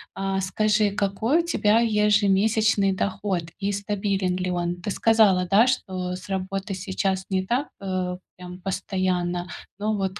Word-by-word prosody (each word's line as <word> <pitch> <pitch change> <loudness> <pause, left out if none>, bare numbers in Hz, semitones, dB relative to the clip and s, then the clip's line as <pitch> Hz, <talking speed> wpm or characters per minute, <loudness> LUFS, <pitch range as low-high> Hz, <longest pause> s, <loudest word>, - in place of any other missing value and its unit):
А 195 0 -1
скажи, 210 +2 +2
какой 210 - +1
у - - -9
тебя 225 -8 +3
ежемесячный 210 -1 +3
доход 190 -2 -2 0.2
и 200 0 -1
стабилен 195 -2 -1
ли 185 0 -2
он? 175 0 -2
Ты 205 - -4
сказала, 205 -4 +3
да, 210 +7 +5
что 185 -7 -2
с 185 - -10
работой 195 +1 -3
сейчас 190 0 -2
не 190 -1 0
так, 250 +8 0
э, 185 -2 -3 0.2
прям 180 0 -9
постоянно, 185 -2 -2 0.3
но 215 +1 -1
вот 190 0 -3
195 Hz, 145 wpm, -24 LUFS, 185-210 Hz, 0.3 s, да